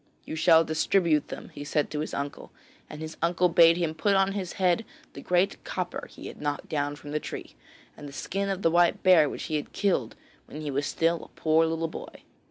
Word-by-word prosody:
'You - - -5
shall 165 0 +5
distribute 160 0 +2
them,' - - -8
he 145 - -8
said 150 0 -1
to 150 - -3
his 155 - -3
uncle, 140 0 -5 0.4
and 150 - -8
his 160 0 -7
uncle 175 +2 +2
bade 165 0 +6
him 170 -3 -1
put 200 +5 +1
on 195 0 +3
his 195 -3 -4
head 185 +3 +2 0.3
the - - -9
great 180 +2 +1
copper 180 -1 -4
he - - -12
had - - -9
knocked 145 -1 -3
down 145 -1 -1
from 145 0 -10
the 150 - 0
tree, - - -7 0.4
and 145 - -9
the - - -11
skin 195 +8 -3
of 195 0 -3
the 165 - +4
white 175 0 +3
bear 170 -6 +6
which - - -6
he 155 -2 -1
had 150 - -7
killed 175 - 0 0.3
when 150 - -8
he 150 -2 -3
was 140 +2 -1
still 165 0 0
a - - -21
poor 160 +1 +3
little 165 0 -1
boy. - - -10
165 Hz, 225 wpm, -27 LUFS, 150-180 Hz, 0.4 s, bade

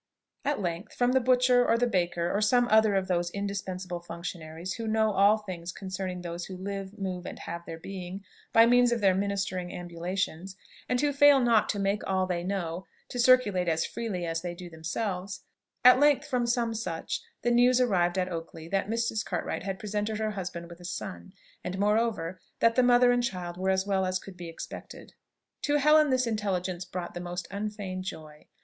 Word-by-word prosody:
At 290 -3 0
length, 175 -1 -4
from 245 0 +2
the 260 - +4
butcher, 250 0 +4
or 230 -1 +3
the 245 - +2
baker, 175 -5 0
or 205 - +1
some 245 +3 +4
other 220 -2 +5
of 190 -1 +1
those 175 -1 0
indispensable 190 -2 -4
functionaries 170 0 -6
who 230 -1 -5
know 220 0 +2
all 200 +2 +5
things 180 -5 -6
concerning 185 -1 -5
those 175 0 -5
who 185 - -8
live, 195 +1 -5
move, 185 -3 -4
and - - -7
have 170 +1 -6
their 165 - -6
being, 190 +2 -7 0.3
by 225 0 +7
means 245 0 +5
of 240 - +1
their 195 -3 +4
ministering 195 -2 -2
ambulations, 175 +1 -4 0.3
and 250 - +1
who 290 -1 +1
fail 285 0 +7
not 235 -4 +3
to 205 - 0
make 200 +1 0
all 190 -1 +1
they 175 -2 -2
know 180 -2 -3 0.2
to 245 - -5
circulate 235 -8 +4
as 160 0 +1
freely 200 -7 -4
as 165 0 -2
they 175 0 -5
do 175 -1 -9
themselves, 180 +3 -4 0.4
at 250 +1 +9
length, 290 -1 +4
from 245 -2 0
some 235 -1 +1
such 185 -7 -3 0.2
the 240 - +2
news 245 +1 +5
arrived 185 -7 +2
at 185 -1 +1
Oakley 165 -2 -6
that 195 +1 0
Mrs. 230 -1 0
Cartwright 175 -3 -3
had 190 +1 -4
presented 210 +1 -2
her 215 0 -1
husband 180 -4 -5
with 170 0 -12
a - - -13
son; 90 - -6 0.3
and 185 +1 -4
moreover, 205 -4 0 0.2
that 230 - +4
the 255 - +4
mother 245 0 +5
and 245 0 +2
child 180 -6 -3
were 190 +1 -1
as 190 0 +2
well 190 -2 +1
as 185 0 0
could 190 0 -11
be 175 -1 -8
expected. 165 - -9 0.5
To 290 - +1
Helen 300 +1 +5
this 255 -1 +2
intelligence 190 -5 -2
brought 180 -1 -6
the 175 - -5
most 175 0 -5
unfeigned 200 -2 -4
joy. 155 -4 -9
195 Hz, 195 wpm, -28 LUFS, 175-225 Hz, 0.5 s, at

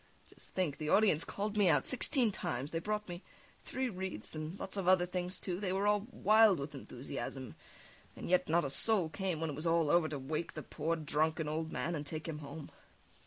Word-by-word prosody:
Just - - -12
think, 175 -7 0
the 155 -1 -2
audience 195 -6 +4
called 205 +1 -3
me 200 -4 +5
out 150 - +3
sixteen 255 -2 +1
times; 135 -6 -3
they 165 - -1
brought 210 +3 -2
me 175 0 -6 0.4
three 260 0 -2
wreathes 190 - -5
and 155 +5 -5
lots 190 - -4
of 195 -3 -2
other 185 -1 +5
things, 180 0 -2
too; 180 -1 -3
they 195 -3 -1
were 195 +2 0
all 210 +1 +2
wild 215 -4 +5
with 140 +1 -5
enthusiasm, 135 -1 -6 0.6
and - - -7
yet 180 -2 +2
not 170 0 +3
a - - -1
soul 195 +1 +3
came 185 -1 -2
when 160 -1 -1
it - - -5
was 155 +4 -2
all 165 -3 +3
over 170 -2 +4
to 150 - -3
wake 155 +5 -3
the - - -5
poor, 165 +2 -1
drunken 155 0 0
old 160 +1 -2
man 170 - -2
and 150 -2 -4
take 155 +2 -5
him 155 -2 -4
home. 145 +1 -8
170 Hz, 215 wpm, -34 LUFS, 155-195 Hz, 0.6 s, me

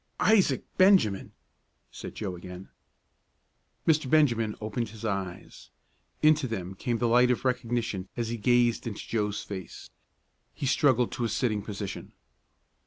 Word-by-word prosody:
"Isaac 215 -3 +3 0.2
Benjamin!" 185 - +4 0.6
said - - -9
Joe 95 -4 -4
again. 90 +1 -10 1.2
Mr. 155 -4 +3
Benjamin 120 -8 +3
opened 110 +1 -3
his 110 +1 -9
eyes. 95 -4 -5 0.5
Into 155 -2 +4
them 95 -5 -4
came 115 +4 -2
the 120 - +1
light 125 +2 +5
of 125 +1 0
recognition 120 -6 -1
as 115 -1 -2
he 120 - -3
gazed 120 +1 +2
into 105 -3 -6
Joe's 105 -2 -1
face. 95 -4 -8 0.6
He - - -4
struggled 130 -3 +3
to 120 - -3
a 115 - 0
sitting 110 -1 0
position. 100 -2 -6
115 Hz, 135 wpm, -28 LUFS, 100-125 Hz, 1.2 s, light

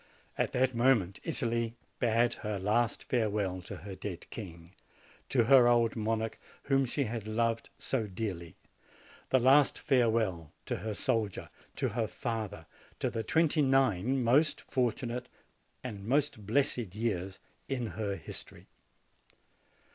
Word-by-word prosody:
At - - -1
that 130 0 +2
moment 115 -6 +2
Italy 115 -7 -1 0.2
bade 120 0 +3
her 105 -2 -2
last 110 +5 +1
farewell 105 -6 0
to 90 - -8
her 100 - -6
dead 95 -1 -6
king, 85 -4 -9 0.6
to 125 -3 +3
her 125 +1 +7
old 120 -2 +3
monarch 110 0 -1 0.2
whom 135 -1 +2
she 140 +4 0
had 110 -3 -4
loved 115 +1 0
so 115 -5 -1
dearly, 90 -5 -5 0.7
the 130 - +5
last 135 +3 +5
farewell 110 - +1
to - - -2
her 110 -1 -4
soldier, 105 -1 -1 0.2
to - - 0
her - - -1
father, 105 -7 -4 0.3
to - - 0
the 115 - -2
twenty 160 +4 +2
nine 130 -2 +2
most 140 +7 +3
fortunate 125 -1 -2 0.5
and 105 -6 -6
most 130 -3 0
blessed 120 -5 +1
years 100 -4 -2 0.3
in 130 -3 -1
her 105 -2 -3
history. - - -7
115 Hz, 130 wpm, -31 LUFS, 105-125 Hz, 0.7 s, her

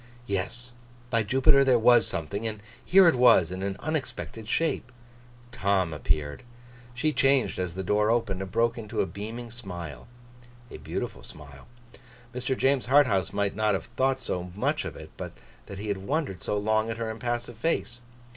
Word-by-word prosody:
Yes! 120 +5 -3 0.4
By 115 -2 +3
Jupiter, 135 +6 +4
there 130 -2 +4
was 120 0 +5
something, 100 +8 -3
and 105 -1 -6 0.2
here 190 0 +6
it 165 - +6
was, 120 -9 +5
in 95 +1 -5
an 100 0 -3
unexpected 140 -7 -4
shape. 145 -2 0 0.6
Tom 95 -6 +1
appeared. 75 0 -1 0.5
She 155 +5 +1
changed 135 -6 +2
as 90 -2 -3
the 95 - -3
door 105 +3 +2
opened, 110 -5 0
and 95 -1 -6
broke 115 +2 +1
into 110 -2 -2
a - - +1
beaming 115 +5 -7
smile. 85 - -7 0.6
A - - -7
beautiful - - -5
smile. 70 +2 -12 0.7
Mr. 125 +1 -2
James 135 -2 +2
Harthouse 125 -9 +4
might 100 -1 -1
not 105 -1 +2
have 90 - -5
thought 130 0 +2
so 90 0 -4
much 105 - 0
of - - -6
it, - - -11
but - - -6 0.3
that 100 - -8
he 105 +2 -5
had 100 -1 -1
wondered 130 - -2
so 105 - -1
long 110 +2 +1
at 115 - -3
her 115 -1 -3
impassive 120 0 -4
face. 120 -5 -1
110 Hz, 175 wpm, -27 LUFS, 95-125 Hz, 0.7 s, here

